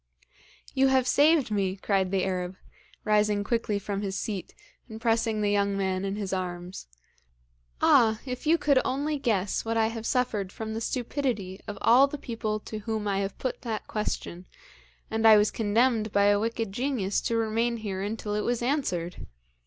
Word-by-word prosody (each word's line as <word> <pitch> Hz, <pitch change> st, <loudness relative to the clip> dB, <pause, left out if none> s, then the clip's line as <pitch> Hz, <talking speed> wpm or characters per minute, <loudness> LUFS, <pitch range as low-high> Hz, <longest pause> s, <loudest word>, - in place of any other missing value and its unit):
'You 270 Hz, 0 st, +4 dB
have 265 Hz, -1 st, +3 dB
saved 290 Hz, -1 st, +4 dB
me!' 195 Hz, -2 st, 0 dB
cried 195 Hz, -1 st, 0 dB
the 190 Hz, -1 st, 0 dB
Arab, 180 Hz, -1 st, -2 dB, 0.5 s
rising 210 Hz, -1 st, +2 dB
quickly 230 Hz, -1 st, 0 dB
from 200 Hz, 0 st, -3 dB
his 195 Hz, -1 st, -3 dB
seat, 200 Hz, -5 st, -5 dB, 0.3 s
and 220 Hz, 0 st, -8 dB
pressing 225 Hz, -2 st, +1 dB
the 205 Hz, -1 st, +1 dB
young 200 Hz, -1 st, +1 dB
man 190 Hz, -1 st, -1 dB
in 195 Hz, 0 st, -2 dB
his 200 Hz, -2 st, -4 dB
arms. 180 Hz, -, -5 dB, 1.0 s
'Ah! 220 Hz, -2 st, +5 dB
if 255 Hz, +2 st, -5 dB
you 330 Hz, +2 st, +5 dB
could 290 Hz, -4 st, +3 dB
only 290 Hz, +3 st, -1 dB
guess 205 Hz, -7 st, 0 dB
what 230 Hz, 0 st, -1 dB
I 220 Hz, 0 st, +3 dB
have 225 Hz, 0 st, -5 dB
suffered 215 Hz, -7 st, 0 dB
from 220 Hz, +1 st, -5 dB
the 225 Hz, -, -3 dB
stupidity 235 Hz, -6 st, -2 dB
of 205 Hz, -, -5 dB
all 255 Hz, +4 st, +6 dB
the 295 Hz, -, -6 dB
people 225 Hz, -5 st, -3 dB
to 215 Hz, -, -6 dB
whom 215 Hz, 0 st, -3 dB
I 195 Hz, -1 st, 0 dB
have 195 Hz, 0 st, -3 dB
put 255 Hz, -, -3 dB
that 225 Hz, -3 st, -4 dB
question, 185 Hz, -4 st, -4 dB, 0.6 s
and 225 Hz, 0 st, +3 dB
I 215 Hz, -1 st, +9 dB
was 210 Hz, 0 st, +3 dB
condemned 225 Hz, 0 st, +1 dB
by 200 Hz, 0 st, +3 dB
a 205 Hz, 0 st, +4 dB
wicked 225 Hz, -1 st, -2 dB
genius 230 Hz, -4 st, -1 dB
to 230 Hz, -, -1 dB
remain 230 Hz, +1 st, 0 dB
here 200 Hz, -4 st, -4 dB
until 210 Hz, +1 st, -3 dB
it 210 Hz, -, 0 dB
was 240 Hz, +1 st, -1 dB
answered! 185 Hz, -, -2 dB
215 Hz, 180 wpm, -27 LUFS, 200-235 Hz, 1.0 s, I